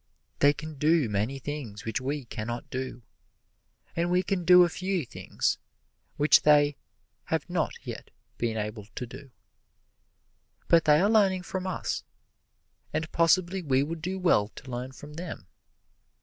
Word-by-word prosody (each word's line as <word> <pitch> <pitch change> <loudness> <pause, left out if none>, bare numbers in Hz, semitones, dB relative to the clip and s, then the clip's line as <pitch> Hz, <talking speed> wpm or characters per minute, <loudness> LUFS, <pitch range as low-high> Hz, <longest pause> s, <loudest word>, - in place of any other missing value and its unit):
They 145 - +6
can 150 0 -8
do 155 -3 +3
many 105 +7 -1
things 135 -7 -6
which 110 +3 -2
we 140 +1 -3
can 110 -1 -6
not 120 0 -4
do, 130 -2 -5 0.9
and 170 +1 0
we 180 +1 +2
can 185 -1 -1
do 180 +1 +8
a - - +4
few 185 -1 -2
things - - -2 0.6
which 145 0 +6
they 145 -1 +5 0.5
have - - -1
not - - -1
yet - - -7 0.3
been 115 -2 -1
able 105 -1 -4
to 125 - -3
do; 130 +3 -11 1.4
but 165 -1 +5
they 150 0 +6
are 195 - +4
learning 195 -4 +3
from 185 +1 -4
us, 115 - -2 0.9
and 160 0 -2
possibly 175 +2 +3
we 135 -4 +2
would 160 +2 -5
do 185 +3 -3
well 170 - +3
to 130 +4 -12
learn 125 +2 -4
from 145 +3 -11
them. 165 - -7
150 Hz, 155 wpm, -28 LUFS, 125-175 Hz, 1.4 s, do